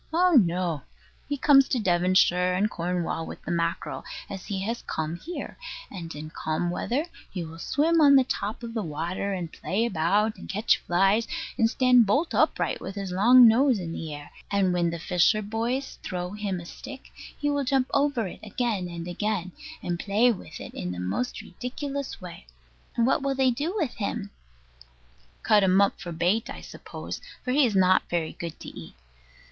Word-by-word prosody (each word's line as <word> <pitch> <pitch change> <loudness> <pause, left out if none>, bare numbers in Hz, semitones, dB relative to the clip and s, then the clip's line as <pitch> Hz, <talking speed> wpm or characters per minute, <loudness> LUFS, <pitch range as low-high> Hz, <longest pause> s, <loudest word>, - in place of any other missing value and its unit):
Oh 360 +3 +4
no: 180 - +3 0.5
he 285 - -1
comes 275 -1 +6
to - - 0
Devonshire 180 -2 +3
and 210 +3 +1
Cornwall 175 -1 -2
with - - -8
the - - -4
mackerel, 170 0 -2 0.3
as 195 -2 -7
he 195 -2 -2
has 230 +4 -3
come 160 +1 -2
here; 340 - -7 0.3
and 165 -4 -7
in 155 +1 -7
calm 160 +3 -2
weather 255 - -1 0.2
he 180 -3 -4
will 160 +1 -10
swim 320 - +2
on 280 -2 +7
the 265 - +7
top 220 -2 -3
of 230 -1 -6
the 225 - -1
water, 170 +4 -3
and 175 -3 -4
play 210 +5 -1
about, 205 +3 +1
and - - -11
catch 210 +3 +2
flies, 195 +6 +2 0.3
and 225 - +3
stand 250 -2 +5
bolt 285 - +1
upright - - +1
with 190 - -6
his 195 -2 -4
long 240 +6 +7
nose 250 +2 +4
in 175 -4 -5
the 160 -1 -5
air; 145 0 -8 0.2
and 195 -2 +2
when 175 -1 +1
the 170 - -4
fisher 180 +6 +2
boys 230 +6 -3
throw 180 0 -4
him 205 -3 -3
a 170 - -9
stick, 270 +8 -10 0.3
he 290 0 0
will 285 -1 0
jump 265 0 +2
over 280 -5 +2
it 185 - -7
again 215 -3 -2
and 170 0 -6
again, 185 0 -2 0.3
and 175 -1 -2
play 220 +6 +3
with 170 -7 -8
it - - -9
in 90 - -4
the 90 - -5
most 95 - -2
ridiculous 275 +2 -5
way. 175 - -10 0.5
And 230 - +3
what 265 - +2
will 275 0 0
they 260 -1 +3
do 300 - -2
with 320 - -1
him? 205 -1 -3 1.1
Cut 210 -2 +5
him 190 0 +4
up 200 -1 +2
for 175 -3 -6
bait, 175 +7 +1
I - - -7
suppose, - - -8 0.2
for 250 - 0
he 275 0 +4
is 215 - -2
not 185 0 +4
very 170 -2 -1
good 170 -2 -7
to - - -9
eat. - - -11
200 Hz, 190 wpm, -26 LUFS, 175-250 Hz, 1.1 s, on